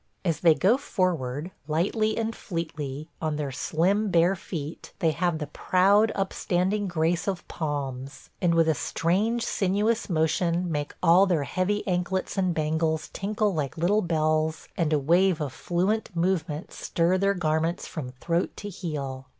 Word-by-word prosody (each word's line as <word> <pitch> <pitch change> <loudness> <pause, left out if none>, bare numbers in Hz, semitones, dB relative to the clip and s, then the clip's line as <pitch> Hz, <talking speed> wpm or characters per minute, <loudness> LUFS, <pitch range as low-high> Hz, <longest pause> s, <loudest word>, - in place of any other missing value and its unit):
As 165 -3 +1
they 165 -3 +5
go 210 +10 +3
forward, 175 - -1 0.2
lightly 205 +8 +1
and 225 0 -1
fleetly, 155 -5 -5
on 155 -2 -1
their 145 -2 -3
slim 190 +10 +1
bare 175 +2 +4
feet 160 -3 -7
they 165 - +2
have 170 +1 0
the 155 - -3
proud, 200 +8 +3
upstanding 195 +1 0
grace 170 0 0
of 190 -3 -3
palms, 140 -4 -5
and 170 -2 +3
with 165 -1 +4
a 160 - +4
strange 205 +11 0
sinuous 210 +4 0
motion 170 +1 +1
make 145 -1 -3
all 180 +3 +6
their 170 -6 +1
heavy 185 +10 -1
anklets 185 +1 -1
and 185 -3 +1
bangles 160 0 0
tinkle 210 +1 0
like 150 -3 -3
little 195 +6 +2
bells 155 -2 0
and 165 -3 0
a 155 - +4
wave 170 +5 +3
of 145 -4 -3
fluent 190 +6 0
movement 165 -3 -1
stir 175 +2 +1
their 200 +1 +2
garments 165 0 0
from 150 -7 -6
throat 170 +7 -1
to 205 - -6
heel. 140 -8 -5
170 Hz, 155 wpm, -26 LUFS, 155-190 Hz, 0.2 s, all